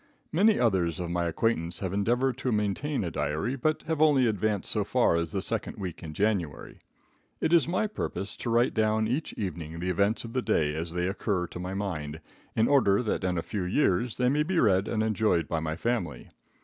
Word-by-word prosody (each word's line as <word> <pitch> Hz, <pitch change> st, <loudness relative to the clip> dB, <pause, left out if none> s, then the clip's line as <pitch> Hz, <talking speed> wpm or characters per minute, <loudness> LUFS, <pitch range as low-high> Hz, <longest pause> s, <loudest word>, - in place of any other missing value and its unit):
Many 205 Hz, +7 st, +4 dB
others 95 Hz, -7 st, +1 dB
of 85 Hz, -1 st, -3 dB
my 85 Hz, 0 st, 0 dB
acquaintance 85 Hz, -1 st, 0 dB
have 95 Hz, -1 st, -3 dB
endeavored 120 Hz, +6 st, +1 dB
to 130 Hz, -, -1 dB
maintain 110 Hz, +7 st, -1 dB
a 85 Hz, -, -3 dB
diary, 75 Hz, -, -1 dB
but 155 Hz, +4 st, 0 dB
have 160 Hz, -2 st, -2 dB
only 145 Hz, -5 st, +5 dB
advanced 105 Hz, -2 st, 0 dB
so -, -, +1 dB
far -, -, +2 dB
as 85 Hz, -1 st, -1 dB
the 95 Hz, 0 st, -2 dB
second 115 Hz, +1 st, -2 dB
week 90 Hz, -5 st, -6 dB
in 80 Hz, -2 st, -8 dB
January. 100 Hz, -8 st, -1 dB, 0.6 s
It 160 Hz, -, +1 dB
is 170 Hz, -3 st, +5 dB
my 185 Hz, +5 st, +1 dB
purpose 105 Hz, -, -4 dB
to -, -, -4 dB
write 120 Hz, +2 st, +3 dB
down 110 Hz, 0 st, +2 dB
each 130 Hz, +7 st, -2 dB
evening 85 Hz, -5 st, -5 dB
the 90 Hz, +2 st, -1 dB
events 100 Hz, +5 st, +1 dB
of 115 Hz, 0 st, -8 dB
the 130 Hz, -, +1 dB
day 75 Hz, -9 st, +1 dB
as 80 Hz, +2 st, -4 dB
they 90 Hz, 0 st, 0 dB
occur 95 Hz, -1 st, -1 dB
to 90 Hz, -, -8 dB
my 90 Hz, +2 st, -4 dB
mind, 80 Hz, -7 st, -4 dB, 0.4 s
in 110 Hz, +1 st, +3 dB
order 125 Hz, -7 st, +4 dB
that 110 Hz, -, -1 dB
in 90 Hz, -1 st, 0 dB
a 85 Hz, -, -1 dB
few 105 Hz, -, -3 dB
years 100 Hz, +2 st, +1 dB
they 125 Hz, -, +2 dB
may 145 Hz, +4 st, +2 dB
be 170 Hz, +3 st, +1 dB
read 95 Hz, -3 st, +3 dB
and 110 Hz, -1 st, 0 dB
enjoyed 110 Hz, -6 st, +1 dB
by 85 Hz, -, -1 dB
my 80 Hz, 0 st, -3 dB
family. 90 Hz, -, -2 dB
100 Hz, 215 wpm, -28 LUFS, 85-120 Hz, 0.6 s, only